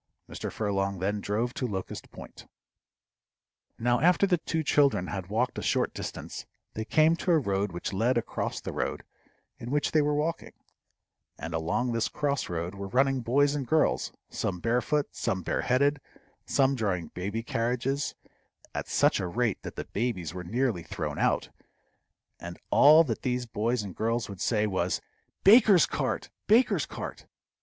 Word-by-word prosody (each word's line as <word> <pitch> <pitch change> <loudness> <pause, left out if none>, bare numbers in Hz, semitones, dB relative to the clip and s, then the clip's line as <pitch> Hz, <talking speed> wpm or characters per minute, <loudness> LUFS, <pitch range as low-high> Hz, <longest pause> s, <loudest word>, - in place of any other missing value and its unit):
Mr. - - -5
Furlong 100 -2 -1
then 100 +3 -1
drove 115 +5 -1
to 125 - -2
Locust 95 -4 -5
Point. - - -12 1.3
Now 120 +1 +2
after 180 +6 +4
the 180 -3 +2
two 160 0 -2
children 140 -10 +3
had 95 -2 -5
walked 120 +4 0
a - - -4
short - - 0
distance, - - -6 0.3
they 110 - -4
came 155 +5 +4
to 180 - -4
a 170 - +6
road 100 -7 0
which 85 +3 -5
led 120 +6 +2
across 120 - -2
the - - -6
road - - -2 0.6
in 120 - -7
which 145 +2 0
they 155 - +4
were 150 0 +1
walking, 160 +3 -2 0.8
and - - -6
along 80 +10 0
this 115 -1 0
cross 140 -2 -1
road 85 +1 -3
were 100 0 -6
running 135 +4 +2
boys 140 +5 +2
and 140 -4 -3
girls, 155 +4 +2 0.2
some 90 -2 -3
barefoot, 125 - +1
some 95 -1 -2
bare - - -1
headed, 140 +3 +2 0.5
some 135 0 +3
drawing 95 - -2
baby 100 +5 -4
carriages 125 +5 -1 0.6
at - - -4
such - - +3
a 90 - -2
rate 115 +4 -1
that - - -8
the - - -5
babies 100 -8 -2
were 90 -1 -6
nearly 115 0 0
thrown - - -5
out; - - +1 0.9
and 85 0 -8
all 155 +3 +8
that - - -3
these 125 -1 -1
boys 115 +1 -1
and 95 -4 -8
girls 115 +2 -1
would 100 -4 -9
say 110 -2 +1
was, 95 -3 0 0.4
"Baker's 205 -3 +7
cart! - - -3 0.2
baker's 230 +5 +4
cart!" - - -7
120 Hz, 165 wpm, -28 LUFS, 100-140 Hz, 1.3 s, all